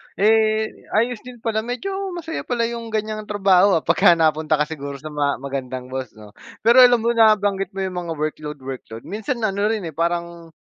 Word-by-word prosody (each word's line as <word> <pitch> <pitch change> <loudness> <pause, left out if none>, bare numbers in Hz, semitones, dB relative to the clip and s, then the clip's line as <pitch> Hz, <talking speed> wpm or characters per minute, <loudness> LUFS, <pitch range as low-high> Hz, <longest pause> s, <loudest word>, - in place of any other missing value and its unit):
Eh 220 +1 +1
ayos 235 +1 +1
din 250 0 -11
pala 220 -2 0
medyo 245 - -4 0.2
masaya 325 -1 -5
pala 240 -2 0
'yung 230 0 -3
ganiyang 215 -1 -3
trabaho 195 -2 +4
ah 160 - 0
pagka 170 +1 +5
napunta 155 -1 +2
ka 150 - +1
siguro 140 -3 -6
sa 155 +3 -9
mga 145 -1 0
magandang 130 -2 -5
boss 130 -4 -5
'no. 105 -1 -14 0.3
Pero 235 +3 +6
alam 245 -1 +8
mo 235 - +2
nabanggit 205 -4 +2
mo 195 - -2
'yung 185 -1 -4
mga 165 - -3
workload-workload 145 -6 -6
minsan 220 +4 -4
ano 200 0 +1
rin 220 -3 -1
eh 165 - -5
parang 170 +1 -3
195 Hz, 185 wpm, -21 LUFS, 155-220 Hz, 0.3 s, alam